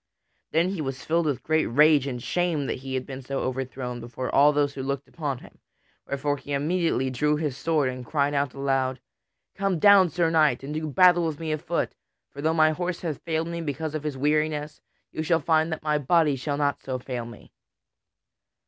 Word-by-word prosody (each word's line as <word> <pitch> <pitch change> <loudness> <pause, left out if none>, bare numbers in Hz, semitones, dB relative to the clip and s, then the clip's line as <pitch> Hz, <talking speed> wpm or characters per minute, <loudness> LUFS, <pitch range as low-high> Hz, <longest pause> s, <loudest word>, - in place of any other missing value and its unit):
Then 165 +3 +2
he 190 -4 -3
was 135 -2 -5
filled 165 0 +1
with 140 -5 -2
great 155 0 +1
rage 145 +2 +4
and 125 -3 -5
shame 175 -5 0
that - - -3
he 135 0 -5
had 130 - -2
been 135 -1 -7
so 135 +1 -3
overthrown 130 -1 -4
before 120 +2 -5
all 145 +2 +6
those 145 -1 +1
who 135 - -5
looked 140 +1 -3
upon 145 -5 -4
him; - - -16 0.5
wherefore 145 +1 -1
he 145 - -7
immediately 150 -2 0
drew 150 +4 +1
his 150 -3 -2
sword 155 -2 +1
and 130 0 -4
cried 145 +2 0
out 140 -2 -1
aloud: 135 -2 0 0.5
"Come 195 -2 0
down, 195 +1 +6
Sir 165 +1 +1
Knight, 155 -6 +3
and 145 +2 -5
do 155 0 -3
battle 175 +3 +5
with 155 -3 -4
me 160 -1 -3
afoot, 160 +3 -2 0.4
for 140 - -8
though 160 +2 +2
my 155 -1 +4
horse 175 +2 -3
hath 160 -5 -4
failed 160 -1 -2
me 170 0 -4
because 155 0 -3
of 155 - -3
his 150 -2 -4
weariness, 150 +1 0 0.3
yet - - -8
you - - +1
shall 165 +1 +2
find 160 +1 +2
that 160 - -4
my 150 -1 +1
body 150 0 +3
shall 140 +2 -3
not 145 -1 0
so 130 -1 -3
fail 125 -2 -5
me." 115 -3 -13
150 Hz, 210 wpm, -26 LUFS, 135-160 Hz, 0.5 s, all